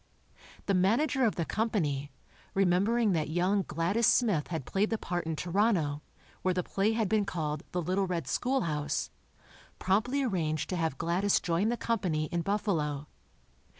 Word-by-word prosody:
The 200 - +1
manager 240 +9 +2
of 220 - +1
the 170 - -1
company, 155 -12 -1 0.5
remembering 200 +4 +3
that 155 -4 0
young 180 +5 +2
Gladys 185 +7 0
Smith 205 - +3
had 160 -7 -4
played 200 +2 0
the 225 - 0
part 175 -5 -3
in 160 - -1
Toronto, 175 -3 +1 0.4
where 185 -1 +1
the 180 - 0
play 200 +5 0
had 220 -2 +1
been 215 +2 +2
called 155 -6 -3
"The 180 -1 -1
Little 190 +3 0
Red 170 -6 -2
Schoolhouse," 170 - -1 0.7
promptly 230 +9 +1
arranged 160 - -1
to - - 0
have 160 -5 -1
Gladys 185 +6 +2
join 180 +5 0
the 240 - 0
company 185 -11 0
in 175 -1 0
Buffalo. 160 -8 -1
185 Hz, 155 wpm, -30 LUFS, 160-215 Hz, 0.7 s, remembering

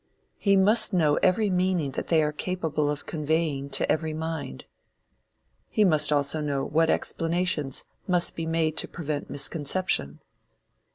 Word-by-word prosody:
He 200 -1 +3
must 210 +3 +5
know 155 -5 +2
every 200 +2 +2
meaning 180 -5 0
that - - -5
they 160 -2 +3
are 150 - 0
capable 155 -2 -2
of 145 -1 -4
conveying 155 -3 -1
to - - +1
every 160 0 -1
mind. 160 - -5 1.0
He 215 - +2
must 155 -6 +3
also 145 +1 +1
know 140 -2 -2
what 160 +2 +1
explanations 165 -6 0 0.2
must 180 -2 +2
be 165 -1 -4
made 160 -1 0
to - - 0
prevent 150 -3 -5
misconception. 145 - -1
160 Hz, 145 wpm, -26 LUFS, 145-180 Hz, 1.0 s, must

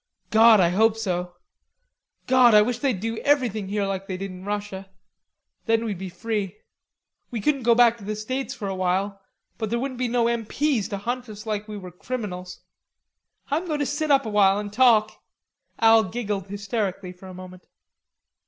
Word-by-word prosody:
"God, 220 0 +7
I 175 -2 +4
hope 220 +4 +3
so. 180 -4 -3 0.9
God, 250 -3 +5
I 210 - +8
wish 245 +2 -2
they'd 260 -9 0
do 225 +2 -3
everything 240 -9 +1
here 205 0 -1
like 195 0 -4
they 185 - -4
did 195 0 -5
in 185 0 -10
Russia; 205 -2 -5 0.8
then 225 0 +2
we'd 205 -5 -3
be 190 -1 -5
free. 205 +2 -3 0.7
We 235 - -4
couldn't 275 +6 +1
go 235 0 +4
back 235 -1 +4
to - - -12
the 215 +2 -3
States 255 +6 -4
for 205 - -5
a 195 - -2
while, 190 +2 -1 0.4
but 220 -2 -2
there 235 - 0
wouldn't 255 0 -4
be 255 - 0
no 235 -1 +1
M.P.'s 235 +1 0
to 200 - -3
hunt 245 +4 -4
us 210 +1 -9
like 210 -1 -3
we 210 -1 -6
were 185 -2 -9
criminals.... 180 -3 -6 0.9
I'm 325 +5 0
going 305 -3 -1
to 290 - -1
sit 295 +3 -2
up 275 -2 +4
a - - -3
while 200 -1 +4
and 205 0 -5
talk." 220 -3 +3 0.6
Al 225 0 +6
giggled 205 -2 -4
hysterically 200 -2 -3
for 185 +1 -14
a 185 - -10
moment. 185 0 -12
215 Hz, 190 wpm, -24 LUFS, 195-235 Hz, 0.9 s, I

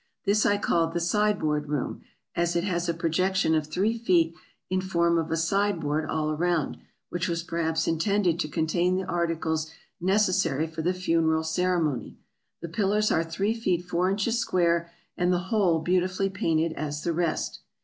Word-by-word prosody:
This 205 +2 +3
I 205 - +3
called 165 -4 +1
the - - +2
Sideboard 170 -5 +1
Room, 145 -3 -2 0.3
as 170 0 0
it 170 - +1
has 175 -3 -1
a - - +2
projection 185 +2 +1
of 155 -2 +1
three 195 +8 0
feet 170 -7 +3 0.3
in 185 0 0
form 170 -2 +2
of 165 0 -3
a 165 - 0
sideboard 165 -4 0
all 155 -1 0
around, 165 -1 0 0.3
which 175 +1 -2
was 170 -1 -2
perhaps 165 -1 -1
intended 175 +1 +1
to - - 0
contain 170 +4 +1
the 190 0 -2
articles 165 -2 -1 0.3
necessary 185 -5 +2
for 160 0 -6
the 180 +3 0
funeral 165 -3 +1
ceremony. 160 -4 -1 0.5
The 170 - -4
pillars 210 +4 +1
are 160 - +2
three 195 +7 -1
feet 185 -6 -1
four 180 +1 +1
inches 210 +4 0
square, 170 -6 +1 0.3
and 180 0 +2
the 180 - +3 0.2
whole 190 -6 +3
beautifully 185 +3 0
painted 165 -4 0
as 150 -1 -4
the 170 - 0
rest. 170 -1 -1
170 Hz, 170 wpm, -27 LUFS, 160-185 Hz, 0.5 s, This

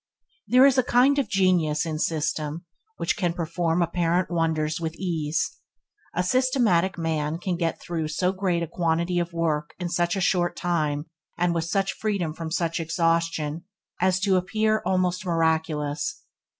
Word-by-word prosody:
There 255 +2 +6
is 270 -2 +5
a - - +4
kind 255 +4 +4
of 275 - -1
genius 180 -6 +2
in 155 -2 -3
system 155 0 -2 0.3
which - - 0
can 175 -5 0
perform 170 0 0
apparent 175 +1 0
wonders 160 -2 0
with 165 -1 -3
ease. 165 -4 -2 0.6
A 180 - +1
systematic 215 -5 +2
man 160 -1 -1
can 180 +1 -2
get 170 -1 -1
through 165 -3 -3
so 180 +4 0
great 185 -3 0
a - - -3
quantity 170 +1 0
of 170 0 -2
work 155 -3 -1
in 180 -2 -3
such 175 +1 0
a - - -1
short 175 -1 +1
time, 155 -4 -1 0.3
and 175 0 +1
with 165 -1 -1
such 195 +3 0
freedom 200 -7 -2
from 160 0 -6
such 170 0 -1
exhaustion, 165 -1 0 0.4
as 185 0 +3
to 195 -2 +3
appear 215 +4 +1
almost 185 -1 +1
miraculous. 160 - -1
170 Hz, 160 wpm, -25 LUFS, 160-185 Hz, 0.6 s, There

